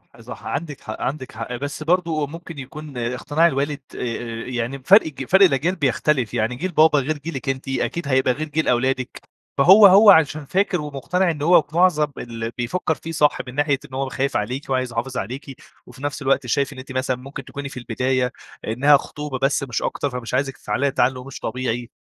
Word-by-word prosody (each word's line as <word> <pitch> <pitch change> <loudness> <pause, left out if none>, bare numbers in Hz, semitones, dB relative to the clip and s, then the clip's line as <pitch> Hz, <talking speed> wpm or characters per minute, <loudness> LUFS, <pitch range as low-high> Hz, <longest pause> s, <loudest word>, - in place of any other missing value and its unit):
آآ - - -16
صح - - -10
عندِك 145 -1 -4
حق 110 - -7
عندِك 135 -1 -3
حق، 115 +2 -6
بس 145 +3 -5
برضه 165 -3 +1
ممكن 165 0 -9
يكون 140 +1 -9
اقتناع 125 +7 +1
الوالد 145 -1 -1 0.2
آآ - - -6 0.5
يعني 125 +1 -3
ب 130 - -20
فرق 200 -2 +7
ج 135 -3 -6
فرق 190 +7 +5
الأجيال 165 +3 +1
بيختلف، 135 - 0
يعني 120 +1 0
جيل 180 +8 -3
بابا 155 -2 +5
غير 150 +3 -2
جيلِك 145 -2 -5
أنتِ 135 +1 -3
أكيد 140 +4 -2
هيبقى 130 -2 +2
غير 155 +4 -4
جيل 155 +2 -1
أولادِك، 130 +1 0 0.4
فهو 195 +8 +8
هو 200 +3 +7
عشان 155 -3 +3
فاكر 180 +2 0
ومقتنع 160 +6 -1
إن 150 - -7
هو 165 +2 +6
في 145 +2 -15
معظم 170 -4 +4
اللي 115 -1 -5
بيفكّر 160 +7 -1
فيه 165 - -8
صح 150 -2 +2
من 125 - -8
ناحية 145 -2 +1
إن 130 - -18
هو 135 +1 -1
ب - - -6
خايف 135 +1 -1
عليكِ 125 +7 -4
وعايز 130 -2 0
يحافظ 125 +3 -3
عليكِ، 130 +5 -5 0.3
وفي 135 - -14
نفْس 145 +1 -3
الوقت 135 -1 +1
شايف 140 +3 0
إن 130 - -10
أنتِ 135 +1 -10
مثلًا 130 0 -1
ممكن 135 +1 -9
تكوني 140 0 -7
في - - -10
البداية، 125 +2 -1 0.4
إنها 140 +6 +5
خطوبة 150 -2 -6
بس 135 +1 +1
مش 120 -4 -3
أكتر 145 - -2
فمش 125 -3 -6
عايزِك 135 +1 -1
تتعلّقي 140 0 -1
تعلُّق 125 -1 0
مش 135 - -8
طبيعي، 120 -2 -3
140 Hz, 205 wpm, -22 LUFS, 130-155 Hz, 0.5 s, فهو